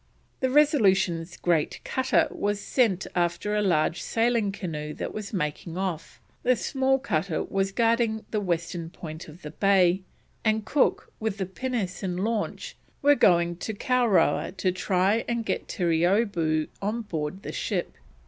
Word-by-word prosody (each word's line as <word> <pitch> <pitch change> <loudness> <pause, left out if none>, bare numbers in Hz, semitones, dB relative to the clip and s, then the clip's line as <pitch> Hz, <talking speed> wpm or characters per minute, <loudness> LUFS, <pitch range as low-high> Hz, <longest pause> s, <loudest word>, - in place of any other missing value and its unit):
The 260 - +1
Resolution's 195 - +3
great 165 -4 0
cutter 260 0 +2
was 205 0 -1
sent 205 -4 +1
after 175 +3 0
a 210 - +2
large 175 -3 +1
sailing 230 -3 +1
canoe 150 -6 -5
that - - -5
was 215 -2 -6
making 165 -1 -3
off, 185 -4 -4 0.2
the 255 +1 +3
small 265 +2 +1
cutter 190 - -1
was 195 0 -1
guarding 230 0 +1
the 215 - 0
western 170 -3 -2
point 160 -2 -8
of 160 +3 -13
the 150 - -6
bay, 190 0 +3 0.4
and 220 -1 +1
Cook, 290 - +1
with 215 -2 -2
the 195 - -1
pinnace 200 -1 -3
and 180 -2 -2
launch, 225 -1 -2 0.3
were 290 +1 +7
going 170 -8 +3
to 220 +4 -4
Kowrowa 240 -6 +2
to 185 -1 0
try 190 +4 +1
and 235 -1 -1
get - - -2
Terreeoboo 170 -2 +1
on 215 +4 -2
board 165 -1 -4
the - - -5
ship. - - -2
195 Hz, 150 wpm, -26 LUFS, 175-225 Hz, 0.4 s, were